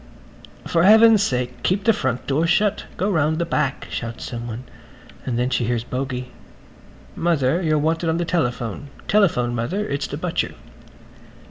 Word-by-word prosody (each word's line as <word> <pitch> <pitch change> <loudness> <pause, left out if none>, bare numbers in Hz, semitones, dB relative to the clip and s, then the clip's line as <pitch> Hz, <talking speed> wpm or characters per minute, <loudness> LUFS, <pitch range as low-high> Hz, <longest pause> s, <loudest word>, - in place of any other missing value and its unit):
"For 165 - +1
heaven's 220 +2 +7
sake 125 -6 -1
keep 195 +7 0
the 225 +1 +4
front 125 - -2
door 150 +4 +1
shut! 205 +4 +1
Go 200 +3 0
round 155 -3 +2
to - - -4
the 170 - 0
back," 150 -5 -1
shouts 115 0 -5
someone. 120 0 -6 0.6
And 120 -2 -1
then 125 +1 0
she 120 - +1
hears 120 -1 -1
Bogey: 125 0 -4 0.8
"Mother, 165 -1 +1
you're 155 -3 +2
wanted 160 +2 0
on 160 - +1
the 175 - -1
telephone. 125 - -2 0.2
Telephone, 160 -13 +2
Mother. 170 - -2
It's 140 +1 -2
the 145 - -5
butcher." 170 +1 -2
150 Hz, 160 wpm, -22 LUFS, 125-175 Hz, 0.8 s, heaven's